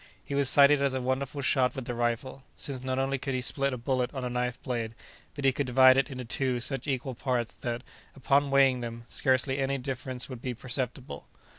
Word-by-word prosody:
He - - -7
was 140 -2 +4
cited 140 0 +6
as 140 -1 +1
a - - 0
wonderful 130 +2 -2
shot 130 -2 +2
with 135 -3 -5
the 120 - -3
rifle, 120 +3 -2
since 135 -3 -5
not 130 0 -2
only 135 0 0
could 135 0 -3
he 130 - -1
split 140 +2 -1
a 125 - -3
bullet 125 0 -1
on 130 -1 -3
a 125 - -3
knife 125 0 -2
blade, 115 -3 -3 0.4
but 140 -2 -4
he 135 - +6
could 135 +1 -2
divide 130 +1 +7
it 135 - +2
into 130 -2 -6
two 125 +1 0
such 135 +2 -3
equal 130 -1 -2
parts 125 -2 -2
that, 120 0 -4 0.3
upon 140 +1 +2
weighing 135 -2 +4
them, 115 0 -6
scarcely 135 0 +1
any 135 0 0
difference 130 -1 -4
would 125 -3 -8
be 125 -1 -4
perceptible. 125 +1 -5
130 Hz, 215 wpm, -28 LUFS, 125-135 Hz, 0.4 s, divide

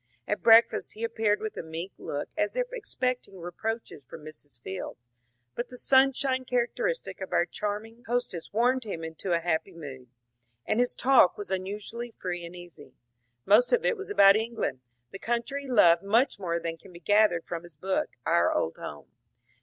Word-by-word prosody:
At 210 - -1
breakfast 225 0 +5
he 225 +2 -3
ap 230 - -5
peared 210 -2 +2
with 220 0 -4
a - - -2
meek 165 +4 -6
look 145 - -4
as 205 - -1
if - - +1
expecting 255 - -3
reproaches 175 -1 -5
from 150 +4 -12
Mrs. 145 -5 -11
Fields; 95 -1 -6 0.6
but 240 - -4
the 250 - -10
sunshine 265 0 +3
charaoteristio 255 - -2
of - - -6
our - - +3
charming 220 +3 -5
host 245 -1 -1
ess 170 - -7
warmed 245 +4 +2
him 185 -7 -5
into 160 +3 -5
a 170 - +4
happy 170 +2 -1
mood, 135 -6 -10 0.6
and 220 - 0
his 245 0 +1
talk 255 -7 +5
was 205 -1 -7
un 185 0 -1
usually 225 +4 -6
free 175 -1 -4
and 170 +1 -9
easy. 175 -7 -13 0.5
Most 215 +5 +5
of 485 0 +2
it - - +2
was 400 -1 -8
about 200 - +7
England, 225 - -2 0.3
the 195 - -8
country 240 +6 -2
he - - -9
loved 170 -8 +6
much 220 +3 +2
more 170 -3 -1
than 165 0 -5
can 190 - -15
be 170 - -12
gathered 205 -4 +3
from 170 -1 -5
his 175 -3 -15
book, 190 +6 -1
^^ - - -49
Our 85 +1 +3
Old 80 - -1
Home." 75 - -9
205 Hz, 195 wpm, -28 LUFS, 170-240 Hz, 0.6 s, about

